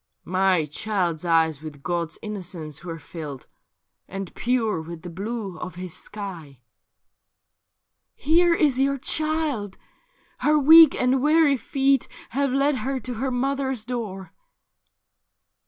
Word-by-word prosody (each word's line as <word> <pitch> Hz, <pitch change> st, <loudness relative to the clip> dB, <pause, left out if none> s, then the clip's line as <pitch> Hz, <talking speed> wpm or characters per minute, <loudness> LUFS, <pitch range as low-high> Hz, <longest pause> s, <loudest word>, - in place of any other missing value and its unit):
' -, -, -56 dB, 0.2 s
My 185 Hz, -5 st, +3 dB
child's 175 Hz, 0 st, -2 dB
eyes 160 Hz, -3 st, +2 dB
with 150 Hz, -3 st, -10 dB
God's 170 Hz, -2 st, -2 dB
innocence 175 Hz, -8 st, -7 dB
zuere 170 Hz, -1 st, -6 dB
filled, 145 Hz, -3 st, -8 dB, 0.6 s
And 195 Hz, -1 st, -6 dB
pure 225 Hz, -7 st, 0 dB
with 160 Hz, 0 st, -9 dB
the 175 Hz, -, -7 dB
blue 200 Hz, -1 st, -5 dB
of 180 Hz, -, -6 dB
His 180 Hz, -2 st, -7 dB
sky.' 175 Hz, -, -8 dB, 0.8 s
' -, -, -58 dB
Here 335 Hz, +3 st, +3 dB
is 285 Hz, -6 st, +2 dB
your 275 Hz, +1 st, +2 dB
child; 300 Hz, -8 st, -1 dB, 0.6 s
her 300 Hz, +1 st, +3 dB
weak 315 Hz, +1 st, +8 dB
and 255 Hz, +1 st, +2 dB
weary 305 Hz, 0 st, +4 dB
feet 270 Hz, +2 st, +1 dB, 0.2 s
Have 275 Hz, +2 st, 0 dB
led 275 Hz, +1 st, +2 dB
her 265 Hz, +1 st, -2 dB
to 250 Hz, 0 st, -5 dB
her 255 Hz, +4 st, -2 dB
mother's 265 Hz, -2 st, -1 dB
door.' 215 Hz, -6 st, -5 dB
215 Hz, 130 wpm, -24 LUFS, 170-275 Hz, 0.8 s, weak